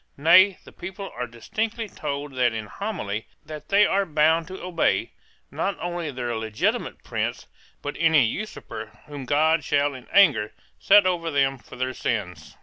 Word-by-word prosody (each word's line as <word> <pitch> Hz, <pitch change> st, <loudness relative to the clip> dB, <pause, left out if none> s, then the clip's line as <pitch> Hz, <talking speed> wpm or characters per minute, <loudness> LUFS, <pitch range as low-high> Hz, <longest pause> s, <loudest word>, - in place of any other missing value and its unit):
Nay, 180 Hz, +6 st, +6 dB
the -, -, -14 dB
people 190 Hz, +2 st, -8 dB
are 125 Hz, 0 st, -3 dB
distinctly 220 Hz, -, -3 dB
told 145 Hz, -5 st, -5 dB
in -, -, -12 dB, 0.2 s
that 110 Hz, -1 st, -5 dB
Homily 110 Hz, -, -3 dB, 0.2 s
that 155 Hz, -1 st, -9 dB
they 205 Hz, +1 st, +5 dB
are 200 Hz, +1 st, +2 dB
bound 160 Hz, -1 st, +2 dB
to 190 Hz, +1 st, -8 dB
obey, 180 Hz, -2 st, 0 dB, 0.4 s
not 195 Hz, -2 st, -2 dB
only 175 Hz, -2 st, -3 dB
their 120 Hz, -3 st, -3 dB
legitimate 110 Hz, -1 st, -2 dB
prince, -, -, -3 dB, 0.4 s
but 145 Hz, -, -4 dB
any 160 Hz, -6 st, +5 dB
usurper 110 Hz, -, -6 dB
whom 145 Hz, -3 st, -8 dB
God 155 Hz, +3 st, +3 dB
shall 145 Hz, +1 st, +1 dB
in 130 Hz, -2 st, -11 dB
anger 140 Hz, -, +4 dB, 0.3 s
set 200 Hz, 0 st, +6 dB
over 175 Hz, -3 st, 0 dB
them 135 Hz, -3 st, +1 dB
for -, -, -13 dB
their 130 Hz, +1 st, -2 dB
sins. 105 Hz, -9 st, -4 dB
150 Hz, 160 wpm, -24 LUFS, 125-185 Hz, 0.4 s, Nay